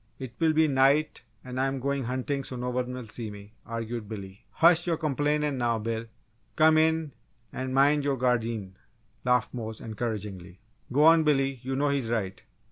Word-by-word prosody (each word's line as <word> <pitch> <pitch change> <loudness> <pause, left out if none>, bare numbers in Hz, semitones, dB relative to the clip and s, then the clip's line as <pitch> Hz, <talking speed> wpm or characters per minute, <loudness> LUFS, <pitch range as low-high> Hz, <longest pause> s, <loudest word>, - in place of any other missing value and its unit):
It 130 -3 -7
will 160 -1 +3
be 160 0 +4
night 140 +2 +3 0.2
and 125 0 -5
I'm 135 0 0
going 140 0 -1
huntin' 130 +3 -2
so 130 - -6
no 125 0 -3
one 125 0 -2
will 125 -1 -6
see 110 0 -6
me!" 105 0 -11
argued 115 -1 -5
Billy. 100 -3 -9
"Hush 170 +1 +5
yo' 165 -2 +1
complain' 150 -1 0
now, 120 -2 +1
Bill! 115 +1 -3 0.5
Come 155 0 +5
in 160 -1 +1 0.4
an' 130 0 -4
min' 140 +3 +4
yo 140 -1 0
gardeen!" 115 -6 -1 0.5
laughed 125 0 +1
Mose, 110 -3 -5
encouragingly. 105 -5 -5 0.3
"Go 145 +4 +3
on, 165 0 +7
Billy, 135 -3 +1
you 130 +1 -3
know 145 +2 +1
he's 135 -5 -1
right! 100 -5 -2
130 Hz, 175 wpm, -27 LUFS, 115-145 Hz, 0.5 s, on